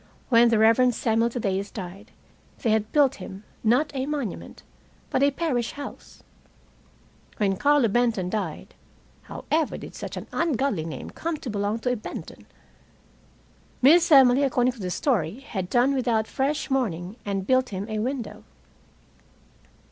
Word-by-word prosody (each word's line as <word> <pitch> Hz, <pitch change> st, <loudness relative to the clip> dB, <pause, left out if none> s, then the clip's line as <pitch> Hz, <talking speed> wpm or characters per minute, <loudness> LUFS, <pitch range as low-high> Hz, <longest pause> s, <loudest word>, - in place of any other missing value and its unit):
When 235 Hz, -1 st, +6 dB
the 230 Hz, -, +3 dB
Reverend 230 Hz, +3 st, +4 dB
Samuel 230 Hz, 0 st, +1 dB
Thaddeus 200 Hz, -4 st, -2 dB
died, 195 Hz, 0 st, -8 dB, 0.5 s
they 230 Hz, -, +2 dB
had 215 Hz, 0 st, 0 dB
built 280 Hz, -3 st, +3 dB
him, 190 Hz, +2 st, -9 dB, 0.2 s
not 250 Hz, +7 st, +2 dB
a 265 Hz, 0 st, -2 dB
monument, 285 Hz, -, -5 dB, 0.5 s
but 260 Hz, -, +1 dB
a 280 Hz, -, +5 dB
parish 275 Hz, -5 st, -2 dB
house. 285 Hz, 0 st, -10 dB, 1.1 s
When 195 Hz, -2 st, +1 dB
Carlo 285 Hz, +2 st, +3 dB
Benton 225 Hz, -4 st, +1 dB
died 185 Hz, -5 st, -4 dB, 0.5 s
(however 315 Hz, 0 st, -2 dB
did -, -, -10 dB
such -, -, -7 dB
an -, -, -6 dB
ungodly 270 Hz, -, 0 dB
name 165 Hz, -, -7 dB
come 330 Hz, -1 st, -3 dB
to 255 Hz, -, -6 dB
belong 205 Hz, +1 st, -1 dB
to 250 Hz, -, 0 dB
a -, -, +1 dB
Benton?) 215 Hz, -, -9 dB, 1.4 s
Miss 335 Hz, +5 st, +6 dB
Emily 265 Hz, -2 st, +7 dB
according 255 Hz, -2 st, +2 dB
to 240 Hz, -, -16 dB
the 185 Hz, -3 st, -3 dB
story, 205 Hz, -, -1 dB
had 190 Hz, -10 st, -5 dB
done 250 Hz, +4 st, +3 dB
without 235 Hz, -5 st, +1 dB
fresh 280 Hz, +5 st, -2 dB
mourning 195 Hz, -8 st, -1 dB
and 195 Hz, -2 st, -3 dB
built 255 Hz, +2 st, +2 dB
him 195 Hz, +1 st, -5 dB
a 215 Hz, -1 st, -3 dB
window. 250 Hz, +1 st, -4 dB
240 Hz, 150 wpm, -25 LUFS, 205-270 Hz, 1.4 s, Emily